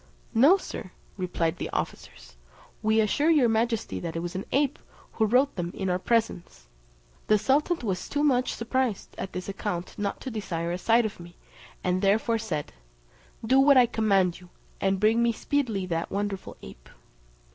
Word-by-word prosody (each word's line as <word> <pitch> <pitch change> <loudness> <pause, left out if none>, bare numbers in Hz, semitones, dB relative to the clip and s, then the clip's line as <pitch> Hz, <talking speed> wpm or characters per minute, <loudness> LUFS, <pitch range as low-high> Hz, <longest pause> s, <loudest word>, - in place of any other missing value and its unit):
"No, 280 +12 +6
Sir," 275 - -7 0.3
replied 175 -3 -1
the - - -4
officers; - - -6 0.5
"we 220 +1 +2
assure 285 +9 +2
your 295 -7 +5
majesty 225 0 0
that 165 -2 -5
it - - -1
was 175 0 -5
an 190 - -4
ape, 285 +1 +1 0.3
who 220 - +1
wrote 260 +6 +3
them 175 -2 -3
in 190 -2 -2
our 180 - 0
presence." 215 - -1 0.6
The 215 - +5
sultan 285 - +2
was 185 -2 -3
too 290 +1 0
much 255 -4 +2
surprised 235 -2 -2
at 190 - -5
this 180 0 -5
account 180 -3 -4
not 200 -1 -2
to 260 - -5
desire 175 -6 -3
a 175 - -3
sight 230 +3 +3
of 215 - -5
me, 175 0 -12 0.5
and 180 0 0
therefore 220 +3 +2
said, 160 -10 -4 0.7
"Do 260 +4 +4
what 275 0 +6
I 250 - +7
command 195 -6 +1
you, 180 -1 -16 0.3
and 195 0 +1
bring 220 +3 +3
me 235 0 +3
speedily 230 -5 -1
that 165 -2 -2
wonderful 200 -1 -4
ape." - - -12
215 Hz, 175 wpm, -27 LUFS, 180-240 Hz, 0.7 s, I